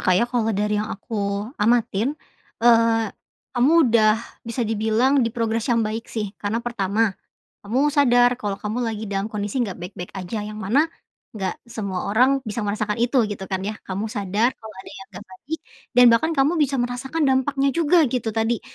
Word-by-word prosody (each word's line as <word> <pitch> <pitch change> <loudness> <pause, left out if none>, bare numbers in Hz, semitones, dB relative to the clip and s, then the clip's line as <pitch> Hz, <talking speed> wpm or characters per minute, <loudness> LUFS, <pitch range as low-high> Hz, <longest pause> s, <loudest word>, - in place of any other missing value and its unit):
Kak 185 - +3
ya, - - +3
kalau 240 -3 0
dari 210 0 0
yang 215 - -4
aku 200 0 -3 0.2
amatin, 230 -1 +2 0.5
eee, 230 -1 +4 0.5
kamu 250 +5 +3 0.2
udah 215 -2 +5 0.3
bisa 235 +1 -2
dibilang 225 +5 +2
di 230 - 0
progress 230 +1 -1
yang 230 -1 +3
baik 220 +2 -4
sih. 210 -3 -4
Karena 205 +2 -1
pertama, 215 -2 0 0.5
kamu 260 +8 +1
sadar 245 -4 +5
kalau 205 -4 -3
kamu 210 +3 -3
lagi 220 -1 -3
dalam 195 +1 -1
kondisi 210 +4 -2
enggak 195 -6 -4
baik-baik 180 0 -7
aja, 195 +3 -4
yang 215 0 -7
mana 265 +11 +3 0.5
enggak 195 -4 -3
semua 200 -6 -4
orang 255 +6 +4
bisa 215 0 -4
merasakan 210 +1 -2
itu, 245 +3 +2
gitu 200 -2 -5
kan 190 -1 -1
ya. 210 +2 -3
Kamu 195 +3 -3
sadar 205 +3 0
kalau 220 -1 -12
ada - - -12
yang 195 - -10
enggak 180 - -9
baik 305 +12 -6 0.4
dan 250 - +8
bahkan 315 +8 +2
kamu 275 +4 +3
bisa 275 -2 +2
merasakan 260 +6 -3
dampaknya 270 +1 +2
juga, 335 +1 +3
gitu 240 -3 -1
tadi 225 +1 0
225 Hz, 180 wpm, -22 LUFS, 205-245 Hz, 0.5 s, dan